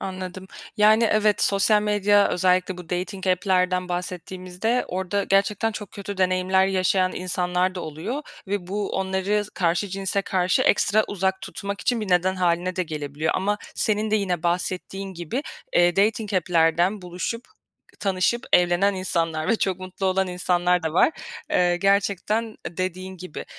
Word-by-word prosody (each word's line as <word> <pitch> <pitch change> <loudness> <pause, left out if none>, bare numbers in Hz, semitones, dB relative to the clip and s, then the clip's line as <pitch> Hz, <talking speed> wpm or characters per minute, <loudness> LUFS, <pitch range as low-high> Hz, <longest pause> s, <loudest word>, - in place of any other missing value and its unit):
Anladım. 185 0 -6 0.3
Yani, 215 +2 +5
evet 215 -1 +2
sosyal 210 +1 +3
medya 205 -1 +3
özellikle 180 0 +1
bu 175 - -10
dating 185 +2 -3
app'lerden 185 0 +1
bahsettiğimizde 180 +5 -3
orada 190 +2 -1
gerçekten 205 +3 +1
çok 210 -2 -7
kötü 200 -1 -7
deneyimler 185 0 +2
yaşayan 185 -1 +1
insanlar 180 0 -1
da 180 - -4
oluyor 165 - -5 0.2
ve 195 -2 -3
bu, 200 +1 -2
onları 190 +2 0
karşı 175 +3 0
cinse 195 +1 -2
karşı 185 -1 +1
ekstra 210 +1 +3
uzak 190 -1 -1
tutmak 200 -2 -5
için 240 +2 0
bir 210 - -4
neden 180 +1 +2
hâline 180 0 0
de 185 - +1
gelebiliyor 150 -1 -3
ama 205 +2 0 0.2
senin 215 0 0
de 215 - +3
yine 180 -5 -1
bahsettiğin 185 +2 -2
gibi, 175 - -4 0.3
eee, 175 +1 +4
dating 210 0 +1
app'lerden 175 +2 +2
buluşup, 180 +7 -4 0.6
tanışıp 195 +4 +1
evlenen 180 +3 +4
insanlar 165 -4 -1
ve 225 - +3
çok 190 -3 -1
mutlu 185 +1 -4
olan 190 0 +1
insanlar 180 0 +1
da 160 -1 -2
var. 180 - +4 0.4
Eee, 175 -1 +3
gerçekten, 200 +3 +1
eee, 215 -7 -9
dediğin 185 +1 -4
gibi. 180 -3 -8
185 Hz, 150 wpm, -24 LUFS, 180-200 Hz, 0.6 s, Yani